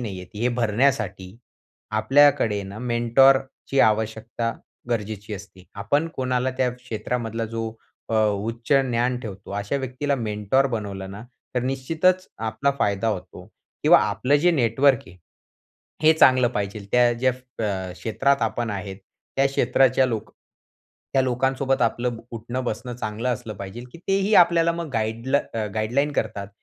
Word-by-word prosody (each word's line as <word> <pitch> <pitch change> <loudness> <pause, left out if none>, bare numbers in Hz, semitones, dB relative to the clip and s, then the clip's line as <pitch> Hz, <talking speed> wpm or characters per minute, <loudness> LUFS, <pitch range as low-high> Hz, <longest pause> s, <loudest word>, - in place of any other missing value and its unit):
नाही 100 -6 -5
आहेत 90 +3 -13
हे 125 - +2
भरण्यासाठी 110 -5 0 0.6
आपल्याकडे 135 -7 +4
ना 100 +2 -8
मेंटॉरची 130 +3 +2
आवश्यकता 110 +1 0 0.4
गरजेची 105 -2 -3
असते. 95 -2 -12
आपण 145 +11 0
कोणाला 130 0 0
त्या 125 -1 +2
क्षेत्रामधला 115 -1 -4
जो 115 0 -3 0.4
अ, 115 - -1
उच्च 115 +5 -3
ज्ञान 120 +1 0
ठेवतो 100 -4 -9
अशा 105 +7 -2
व्यक्तीला 135 +2 -2
मेंटॉर 110 +4 +1
बनवलं 100 -5 -4
ना, 100 +3 -8 0.3
तर 125 - 0
निश्चितच 160 +8 +1
आपला 110 +5 0
फायदा 100 +2 +1
होतो 95 -3 -5 0.4
किंवा - - +7
आपलं 105 +8 +1
जे 175 +5 +3
नेटवर्क 130 -2 +3
आहे, 90 +2 -14 0.9
हे 160 +1 +7
चांगलं 130 -5 +5
पाहिजे. 100 -2 -4
त्या 120 -1 +5
ज्या 130 +2 +1 0.3
अ, 95 -3 -2
क्षेत्रात 135 +6 0
आपण 115 +1 -1
आहे, 100 -1 -5
त्या 135 +7 -3
क्षेत्राच्या 130 -1 +3
लोक 115 -4 -4 0.8
त्या 135 - +3
लोकांसोबत 130 +1 0
आपलं 120 +1 0 0.2
उठणं-बसणं 120 +1 -4
चांगलं 110 +2 -3
असलं 115 -3 -3
पाहिजे 100 +5 -7
की - - -11
तेही 195 +2 +2
आपल्याला 170 -1 +5
मग 170 -1 -5
गाईड 115 +2 -2 0.5
गाईडलाईन 125 +7 0
करतात, 100 -5 -2
120 Hz, 135 wpm, -24 LUFS, 105-130 Hz, 0.9 s, किंवा